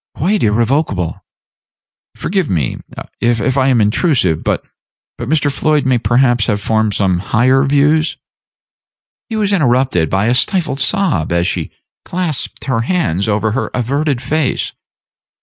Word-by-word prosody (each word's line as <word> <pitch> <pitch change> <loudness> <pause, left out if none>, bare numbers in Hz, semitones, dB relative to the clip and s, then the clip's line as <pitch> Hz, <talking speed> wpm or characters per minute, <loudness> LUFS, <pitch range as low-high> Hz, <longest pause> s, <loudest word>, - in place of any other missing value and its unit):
"Quite 195 +7 0
irrevocable." 110 - 0 0.9
"Forgive 185 -4 -1
me 75 -9 -1 0.4
if 120 +2 +1
I 135 -1 +2
am 130 -3 +3
intrusive; 105 - +1
but - - -1 0.5
but 120 +1 -5
Mr. 150 -2 +2
Floyd 150 +1 +1
may 130 -2 +2
perhaps 120 -1 +2
have 105 -3 0
formed 110 0 0
some 95 -3 +1
higher 125 +7 +2
views." 145 +3 +2 1.1
He 225 - -3
was 205 -2 +1
interrupted 125 - +2
by 95 +2 +1
a 120 - +2
stifled 155 +1 0
sob 140 - 0
as 85 0 +1
she - - -2 0.3
clasped 175 -6 -3
her 130 -4 0
hands 115 - 0
over 110 +1 0
her 130 +5 -2
averted 135 +2 -1
face. 150 0 -1
130 Hz, 135 wpm, -15 LUFS, 110-150 Hz, 1.1 s, am